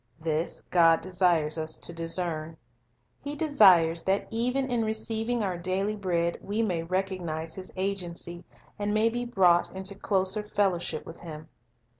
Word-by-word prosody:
This 160 +1 -2
God 165 -2 +4
desires 175 -4 +2
us 155 0 0
to 170 - -3
discern; 165 -1 -1 0.7
He 290 +1 -4
desires 190 - +5
that 195 +1 +1
even 250 +4 0
in 240 -3 0
receiving 220 +1 -1
our 185 -3 -2
daily 190 +4 -1
bread 170 -4 -1
we 210 +3 -1
may 180 -6 -1
recognize 170 -3 -3
His 185 -1 -8
agency, 180 -2 -3 0.4
and 205 +1 -1
may 220 +1 +3
be 240 +1 -3
brought 180 -7 +3
into 190 +1 -3
closer 195 +1 0
fellowship 190 -6 -1
with 165 - -10
Him. 155 -2 -9
185 Hz, 145 wpm, -27 LUFS, 170-210 Hz, 0.7 s, desires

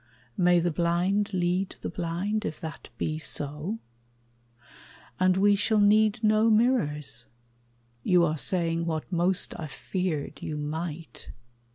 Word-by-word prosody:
May 175 -1 +4
the 175 +1 0
blind 175 +5 +1
lead 180 +1 0
the - - -3
blind, 185 +6 -2
if 155 - -4
that 160 0 -8
be 155 0 -2
so? 150 +7 -3 1.4
And 185 0 +3
we 205 +1 +5
shall 210 +2 +2
need 215 +1 +4
no 215 +1 +4
mirrors? 155 - +1 0.7
You 175 +5 +4
are 155 -2 -1
saying 170 -1 0
What 160 +1 -3
most 175 +1 +1
I 160 - -4
feared 170 +1 -3
you 150 - -4
might. 160 +2 -5
175 Hz, 130 wpm, -27 LUFS, 160-200 Hz, 1.4 s, we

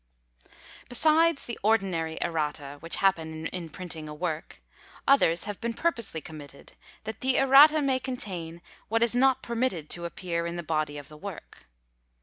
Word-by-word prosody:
Besides 310 +4 +3
the 235 - -5
ordinary 190 -7 +1
errata, 150 -4 -3
which 165 +2 0
happen 160 -4 0
in 170 -1 -5
printing 160 -2 -7
a 150 - -7
work, 160 -1 -4 0.5
others 225 -12 +4
have 205 -2 -6
been 230 0 -2
purposely 230 - -1
committed, 145 -3 -11 0.3
that 220 0 -7
the 260 0 +2
errata 285 +3 +7
may 265 -2 +2
contain 180 -10 -6 0.2
what 225 +1 +2
is 235 - +3
not 265 +1 +3
permitted 230 - -2
to 170 0 -3
appear 170 -1 -3
in 170 - -4
the 175 - -4
body 155 -2 -1
of 145 -1 -9
the 150 0 -13
work. 185 - -10
180 Hz, 155 wpm, -27 LUFS, 160-245 Hz, 0.5 s, errata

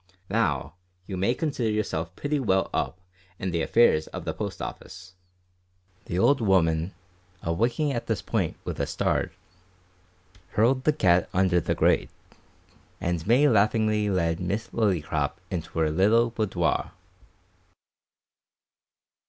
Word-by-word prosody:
Now, 90 -12 0 0.3
you 95 - -5
may 100 +7 +1
consider 140 -7 -1
yourself 90 -6 -2
pretty 145 0 -1
well 95 -7 +1
up 90 - -2 0.4
in 95 +1 -3
the 85 -1 0
affairs 80 -5 +3
of - - -7
the - - -2
Post - - -5
Office." 95 0 -8 0.9
The 85 - -3
old 135 +7 +4
'ooman, 85 -4 +2 0.5
awaking 120 - 0
at 120 - -4
this - - 0
point - - -1
with - - -5
a - - 0
start, - - 0 1.2
hurled 130 +5 +2
the 155 - +5
cat 90 - +3
under 90 -2 +3
the - - -1
grate, - - +2 0.9
and 85 0 -2
May 130 +6 +5
laughingly 110 -2 +2
led 85 -4 0
Miss 100 +5 -3
Lillycrop 80 -9 0 0.2
into 85 -3 -5
her 80 -1 +2
little 110 +8 +3
boudoir. 95 -7 -1
95 Hz, 130 wpm, -26 LUFS, 85-115 Hz, 1.2 s, the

